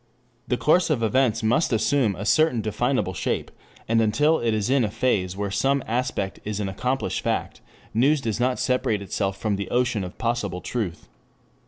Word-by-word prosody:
The 125 - 0
course 175 +7 +3
of 135 -7 +1
events 120 0 +2
must 120 +9 +2
assume 110 -1 +2
a 105 - -6
certain 155 -2 +3
definable 110 -2 0
shape, - - -2 0.4
and 115 0 +3
until 150 +9 +3
it 115 -1 0
is 110 -2 0
in 130 0 +3
a 105 - 0
phase 95 -5 0
where 100 -1 -2
some 135 +7 +1
aspect 115 -5 -2
is 105 0 -3
an 100 - -1
accomplished 125 +8 -2
fact, - - -2 0.3
news 140 +7 +3
does 115 -4 -3
not 125 +1 +1
separate 115 -5 0
itself 95 0 -2
from 105 -3 -1
the 100 - -4
ocean 120 -4 +1
of 90 - -8
possible 115 -6 -2
truth. 100 -6 -4
115 Hz, 180 wpm, -24 LUFS, 105-130 Hz, 0.4 s, course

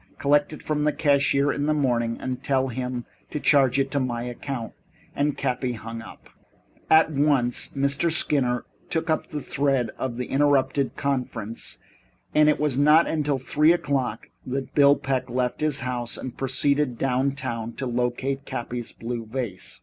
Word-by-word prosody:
Collect 145 +1 +2
it 155 - -9
from 150 -1 -1
the 150 - +3
cashier 140 -1 +2
in 145 +1 -1
the 155 - +2
morning, 120 -5 +1
and 130 -1 -4
tell 135 -1 +1
him 125 0 -4 0.2
to 150 - -3
charge 135 -3 +4
it 135 -1 +1
to 140 - +1
my 120 -3 -2
account." 125 0 -5 0.4
And 145 0 0
Cappy 125 0 -1
hung 115 0 -7
up. 110 - -13 0.6
At 160 0 +6
once 140 -4 +1
Mr. 140 +4 +1
Skinner 130 -6 +2 0.2
took 160 -1 -1
up 155 - 0
the 150 -2 -5
thread 135 -5 0
of 125 -3 -3
the 125 - -2
interrupted 140 -1 +2
conference, 125 -5 -3 0.6
and 150 0 +5
it 150 - +2
was 145 -3 0
not 150 +3 +6
until 150 -3 0
three 150 +5 +3
o'clock 130 -9 -2
that 130 0 -4
Bill 140 -1 +6
Peck 135 -3 -2
left 125 +2 -1
his 150 -3 0
house 125 -2 -3
and 130 -1 -6
proceeded 135 0 +1
downtown 125 -3 -1
to 135 - -5
locate 125 +3 -1
Cappy 120 -3 -5
Rick's 120 - -6
blue 115 -1 -5
vase. 115 -5 -5
135 Hz, 165 wpm, -25 LUFS, 125-145 Hz, 0.6 s, At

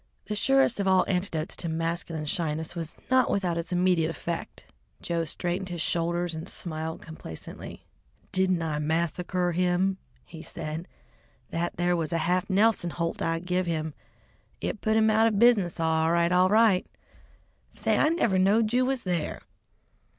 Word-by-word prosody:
The 210 - -3
surest 270 +1 +3
of 200 - 0
all 190 -1 +4
antidotes 180 -4 -1
to 170 - -2
masculine 165 -1 -2
shyness 160 -1 -2
was 165 -2 -5
not 260 -1 +4
without 180 -4 0
its 170 +2 -5
immediate 180 -2 +2
effect. 170 0 -5 0.3
Joe 170 -1 -1
straightened 180 +4 -2
his 175 -1 -5
shoulders 170 +1 0
and 160 +1 -6
smiled 160 -1 -5
complacently. 160 - -9 0.5
"Didn't 185 -2 +1
I 155 -2 -2
massacre 170 +3 0
him?" 180 +2 +1 0.3
he 160 - -10
said. 160 +1 -6 0.6
"That 170 +1 -2
there 175 +1 +2
was 165 -1 -2
a 170 - +1
half 180 +2 +1
Nelson 200 -2 +3
holt 165 0 -3
I 165 0 0
give 180 +1 -1
him. 160 -2 -2 0.7
It 215 - -4
put 220 0 +2
him 220 0 +4
out 220 +1 +4
of 215 -3 0
business 205 -7 +4
all 160 0 +2
right, 170 0 +2
all 180 +1 +4
right. 215 -3 +4 0.8
Say, - - 0
I 305 - +4
never 235 - +2
knowed 215 +4 +3
you 255 +1 +3
was 265 -2 -1
there!" 175 -4 -2
175 Hz, 160 wpm, -27 LUFS, 165-195 Hz, 0.8 s, all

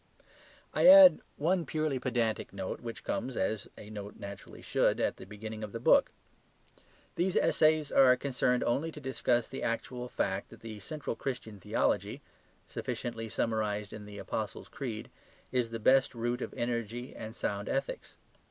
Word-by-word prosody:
I - - +4
add 285 0 +10 0.2
one 175 +4 +1
purely 155 -2 -1
pedantic 120 -3 -1
note 95 -1 -5
which 115 -1 -7
comes, 130 -1 -3
as 100 +2 -1
a 105 - -10
note 105 -1 -7
naturally 100 -1 -9
should, - - +2
at - - 0
the 95 - -11
beginning 110 +1 -7
of 105 - -6
the 115 - -4
book. - - +5 1.1
These 180 +2 +1
essays 155 -1 +3
are 130 -2 +7
concerned 125 -2 +1
only 145 +7 0
to - - -8
discuss 125 -3 0
the - - -6
actual 125 +2 -3
fact 95 -3 -2
that - - -14
the 110 -2 -7
central 150 +3 -5
Christian 115 -6 -5
theology - - 0 0.4
(sufficiently 115 -2 -4
summarized 105 -2 -1
in 105 -1 -8
the 105 -1 -9
Apostles' - - -4
Creed) 115 -5 -5 0.4
is 125 -3 +1
the 115 - -4
best 130 +3 +4
root 120 +2 -1
of - - -4
energy 120 +1 -3
and 110 +1 -7
sound 100 -3 -3
ethics. 135 - -3
120 Hz, 160 wpm, -31 LUFS, 110-135 Hz, 1.1 s, add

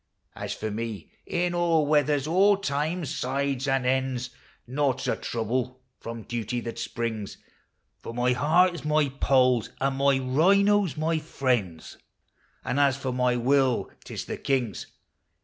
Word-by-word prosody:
As - - -4
for 110 0 -4
me, 110 -4 -5 0.2
in 175 0 0
all 170 -3 +2
weathers, 145 -1 +2
all 195 +5 +4
times, 155 -2 -2
sides, 135 +1 -1
and 135 -2 +1
ends, 130 -1 0 0.3
Naught 135 0 0
's - - -4
a - - +1
trouble 125 +3 -3 0.2
from 115 -1 -7
duty 120 +1 -3
that 115 0 -6
springs, 110 -4 -4 0.6
For - - -8
my 125 +1 +1
heart 165 +8 +3
is 170 - -7
my 150 -1 +2
Poll's, 130 -4 +3
and 135 0 0
my 140 0 +3
rhino 195 +10 +3
's 155 - -8
my 160 +1 0
friend's, 120 - -2 0.7
And 140 - 0
as 140 -2 +3
for 135 -2 -3
my 125 -1 +2
will, 130 0 +2
't - - -9
is - - -4
the - - -5
king's. 125 -8 -1
135 Hz, 155 wpm, -26 LUFS, 125-150 Hz, 0.7 s, all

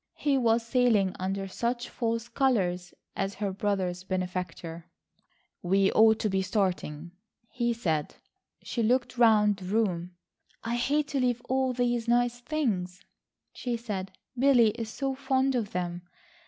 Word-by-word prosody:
He 285 -2 +1
was 230 -3 +2
sailing 230 -6 +2
under 195 +1 -2
such 240 +5 -2
false 230 -1 -2
colours 185 -10 0 0.2
as 195 +1 -2
her 200 -2 -2
brother's 185 -3 -1
benefactor. 180 -2 -4 0.7
"We 195 +2 +3
ought 220 0 +5
to - - +1
be 190 0 +1
starting," 180 -5 -2 0.4
he 240 -1 0
said. 160 -10 -2 0.5
She 235 - -2
looked 245 +2 +1
round 210 -3 +5
the 190 - -9
room. 180 -4 -1 0.5
"I 230 - -2
hate 290 +4 +1
to 280 - -1
leave 245 -2 +1
all 260 0 +1
these 240 -1 0
nice 245 0 +2
things," 205 -11 -2 0.5
she 245 -2 -3
said. 200 -5 -5 0.2
"Billy 250 -3 +5
is 225 0 -6
so 270 +3 -2
fond 265 0 +1
of 230 -5 -1
them. 175 -1 -3
220 Hz, 140 wpm, -28 LUFS, 185-245 Hz, 0.7 s, ought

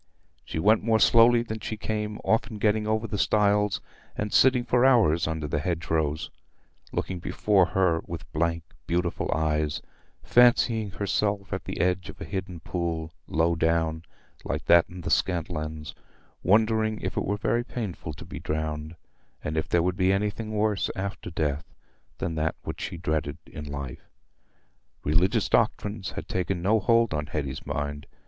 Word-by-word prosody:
She - - -6
went 105 +7 +4
more 110 0 +2
slowly 115 +1 +6
than 110 -1 -5
she 110 - -5
came, 105 -1 -3
often 110 0 +1
getting 105 0 +1
over 110 +1 0
the 105 -2 -3
stiles 105 -1 +2 0.4
and 105 0 -2
sitting 130 -1 +5
for 125 0 +3
hours 110 -13 +4
under 80 -2 -2
the 75 - -1
hedgerows, 80 -2 -1 0.6
looking 95 -2 -3
before 95 +1 +2
her 90 -3 +2
with - - -6
blank, 85 +1 0 0.2
beautiful 85 0 -1
eyes; 75 -1 0 0.4
fancying 120 -3 +4
herself 100 0 -1
at - - -4
the - - -5
edge 90 0 +1
of - - -10
a - - -6
hidden 90 -3 -5
pool, 85 -2 -3 0.2
low 80 +1 +2
down, 80 -1 +1 0.4
like - - -3
that 85 -1 +6
in 90 +1 -9
the 80 - -3
Scantlands; 80 -2 -1 0.5
wondering 110 +2 +3
if 95 - -3
it - - 0
were 100 +1 -1
very 120 +3 +1
painful 105 -10 -5
to - - -10
be - - -7
drowned, 75 +1 -3 0.5
and 75 - -3
if 80 - -1
there 85 -1 +3
would 90 +1 0
be 95 0 +3
anything 105 +2 -1
worse 105 -2 +1
after 100 -1 -4
death 75 -3 -2 0.4
than 80 -1 -3 0.3
what - - -6
she - - -4
dreaded 80 -3 -2
in 75 - -8
life. 70 -3 -7 0.9
Religious 80 +6 +2
doctrines 105 -2 0
had - - -6
taken 90 0 -1
no 105 +6 +3
hold 115 -1 +3
on 75 -1 -2
Hetty's 70 -4 -4
mind. 75 0 -3
90 Hz, 160 wpm, -27 LUFS, 80-105 Hz, 0.9 s, slowly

